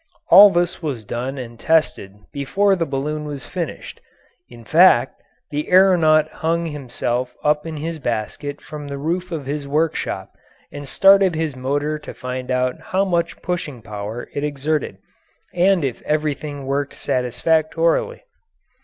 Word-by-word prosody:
All 200 +4 +10
this 175 -1 0
was 135 -9 -4
done 125 +6 -4
and 120 -2 -8
tested 155 -12 +1 0.2
before 195 +8 +1
the 165 -3 -2
balloon 150 +3 -3
was 145 -4 -6
finished 170 -4 -6 0.5
in 120 -1 -13
fact, 155 -5 +4 0.3
the 150 +1 -3
aeronaut 175 -5 +5
hung 170 +1 -1
himself 130 -4 -3
up 150 +1 +1
in 160 -1 -5
his 160 +2 -4
basket 125 +4 -4
from 150 -1 -8
the 140 0 -5
roof 175 +5 -3
of 155 -5 -4
his 145 +1 -4
workshop 155 +3 -1 0.4
and 145 -1 -8
started 195 +5 +5
his 155 -3 -2
motor 145 +4 -2
to - - -10
find 125 0 -5
out 125 0 0
how 190 +1 0
much 170 -3 -1
pushing 150 -9 -4
power 105 +3 -6
it 145 - -3
exerted 150 +1 -2 0.6
and 180 -1 +3
if 130 -4 -3
everything 150 -2 -2
worked 140 +1 -2
satisfactorily. 160 - 0
150 Hz, 145 wpm, -21 LUFS, 130-165 Hz, 0.6 s, All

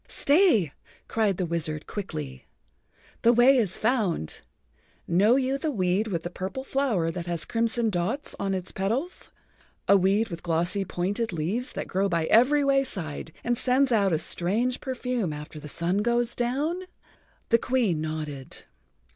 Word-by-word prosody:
"Stay," 285 - +3 0.3
cried 210 -5 +1
the 185 - 0
wizard 160 -2 -3
quickly. 75 - -6 0.7
"The 235 - +6
way 245 +3 +6
is 210 -7 0
found. 215 - 0 0.7
Know 200 +8 +4
you 270 +1 0
the 315 - -1
weed 195 -3 +1
with 170 -6 -2
the 175 - -5
purple 190 +9 -5
flower 245 -12 0
that 175 0 -6
has 170 -2 -2
crimson 230 0 0
dots 195 +10 -2
on 195 -1 0
its 185 -1 -5
petals—a 225 - -2
weed 200 +4 +3
with 170 -2 -6
glossy, 175 +4 0
pointed 200 +6 -2
leaves 190 - -2
that - - -4
grows 195 +1 0
by 165 -2 +1
every 265 - +5
wayside 220 - -1
and 240 0 0
sends 260 +1 +2
out 200 -4 +3
a 160 - +3
strange 220 +11 -1
perfume 250 - -2
after 150 +1 -8
the 150 - -9
sun 175 +6 0
goes 235 +2 +1
down?" 285 +9 -1 0.7
The 230 - +5
Queen 225 -12 +1
nodded. 155 -4 -5
200 Hz, 150 wpm, -26 LUFS, 170-245 Hz, 0.7 s, The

